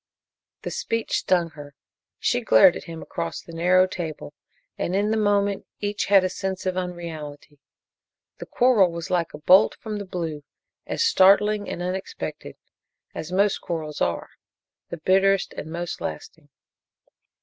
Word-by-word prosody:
The -, -, -4 dB
speech 230 Hz, -1 st, -1 dB
stung 175 Hz, -3 st, +1 dB
her. 145 Hz, -2 st, -12 dB, 0.4 s
She -, -, 0 dB
glared 110 Hz, +10 st, +6 dB
at -, -, -8 dB
him 165 Hz, -1 st, -8 dB
across 85 Hz, 0 st, -4 dB
the 165 Hz, -, -12 dB
narrow 180 Hz, +3 st, +4 dB
table, 160 Hz, -, -6 dB, 0.4 s
and, 180 Hz, -, -2 dB
in 205 Hz, +2 st, +1 dB
the -, -, +2 dB
moment, 205 Hz, -2 st, +1 dB
each 205 Hz, 0 st, -2 dB
had 195 Hz, -2 st, +5 dB
a -, -, +2 dB
sense 190 Hz, 0 st, -4 dB
of 185 Hz, -1 st, -1 dB
unreality. 160 Hz, -5 st, -6 dB, 0.8 s
The -, -, -8 dB
quarrel 230 Hz, -8 st, +4 dB
was 170 Hz, 0 st, -6 dB
like 175 Hz, -2 st, 0 dB
a -, -, -7 dB
bolt 185 Hz, +7 st, +5 dB
from 215 Hz, -2 st, -6 dB
the 200 Hz, -, -6 dB
blue, 165 Hz, -5 st, -5 dB, 0.4 s
as -, -, -1 dB
startling 210 Hz, -, +4 dB
and 175 Hz, -, -4 dB
unexpected 185 Hz, +1 st, -5 dB, 0.6 s
as 160 Hz, +2 st, -6 dB
most 200 Hz, +2 st, +2 dB
quarrels 155 Hz, -3 st, -5 dB
are 85 Hz, -1 st, -1 dB, 0.6 s
the 170 Hz, -, -5 dB
bitterest 190 Hz, +3 st, +2 dB
and 160 Hz, -, -7 dB
most 170 Hz, +1 st, -5 dB
lasting. 150 Hz, -2 st, -7 dB
180 Hz, 150 wpm, -24 LUFS, 160-195 Hz, 0.8 s, glared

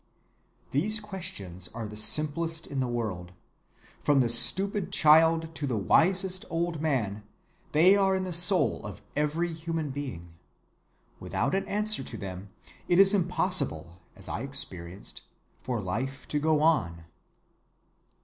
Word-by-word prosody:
"These 210 Hz, +11 st, +1 dB
questions 170 Hz, -, -4 dB
are 115 Hz, -2 st, -5 dB
the 105 Hz, -, -10 dB
simplest 155 Hz, +8 st, +1 dB
in 140 Hz, -, -5 dB
the 130 Hz, -, 0 dB
world. 105 Hz, -7 st, -4 dB, 0.7 s
From 145 Hz, -2 st, +2 dB
the 120 Hz, -3 st, +2 dB
stupid 195 Hz, -, +4 dB
child 160 Hz, +1 st, +4 dB
to 150 Hz, -3 st, -4 dB
the 120 Hz, -4 st, -2 dB
wisest 185 Hz, -, +2 dB
old 165 Hz, -1 st, -2 dB
man, 115 Hz, -10 st, -1 dB, 0.5 s
they 175 Hz, +6 st, +5 dB
are 195 Hz, -1 st, +2 dB
in 190 Hz, -, -2 dB
the 185 Hz, -1 st, -5 dB
soul 180 Hz, +3 st, +2 dB
of -, -, -9 dB
every 160 Hz, +3 st, -1 dB
human 160 Hz, -2 st, -4 dB
being. 125 Hz, -13 st, -7 dB, 0.9 s
Without 135 Hz, +4 st, -2 dB
an 195 Hz, -, -1 dB
answer 210 Hz, -3 st, 0 dB
to 120 Hz, -3 st, -7 dB
them, 95 Hz, 0 st, -8 dB, 0.4 s
it 175 Hz, -, +2 dB
is 195 Hz, +1 st, +6 dB
impossible, 180 Hz, -, 0 dB
as -, -, -11 dB
I -, -, -4 dB
experienced, 90 Hz, +3 st, -4 dB, 0.4 s
for 125 Hz, -3 st, -3 dB
life 120 Hz, +8 st, -5 dB
to 150 Hz, -, 0 dB
go 155 Hz, 0 st, +1 dB
on. 85 Hz, -, +1 dB
150 Hz, 140 wpm, -27 LUFS, 110-175 Hz, 0.9 s, is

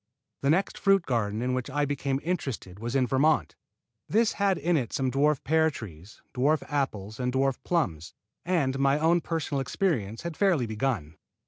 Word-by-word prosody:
The 140 Hz, -, +1 dB
next 185 Hz, +6 st, +1 dB
fruit 195 Hz, -2 st, +4 dB
garden 110 Hz, -2 st, -1 dB
in 125 Hz, 0 st, 0 dB
which 130 Hz, +1 st, -2 dB
I 145 Hz, +2 st, 0 dB
became 140 Hz, -1 st, -1 dB
interested 135 Hz, -, -3 dB
was 120 Hz, +3 st, -4 dB
in 130 Hz, -2 st, +3 dB
Vermont. 135 Hz, -, +2 dB, 0.5 s
This 225 Hz, +2 st, +3 dB
had 200 Hz, -2 st, +1 dB
in 170 Hz, +4 st, +1 dB
it 125 Hz, -7 st, -1 dB
some 135 Hz, -3 st, 0 dB
dwarf 145 Hz, +1 st, +2 dB
pear 160 Hz, +2 st, +3 dB
trees, 100 Hz, -, -10 dB
dwarf 145 Hz, +4 st, +2 dB
apples 110 Hz, -7 st, -3 dB
and 125 Hz, 0 st, 0 dB
dwarf 135 Hz, 0 st, +1 dB
plums, 90 Hz, -, -1 dB, 0.3 s
and 140 Hz, -7 st, 0 dB
my 135 Hz, +1 st, +3 dB
own 165 Hz, +3 st, +3 dB
personal 155 Hz, -4 st, -2 dB
experience 130 Hz, -, -1 dB
had 170 Hz, -2 st, -4 dB
fairly 175 Hz, -10 st, +2 dB
begun. 110 Hz, -, -2 dB
135 Hz, 175 wpm, -27 LUFS, 120-160 Hz, 0.5 s, fruit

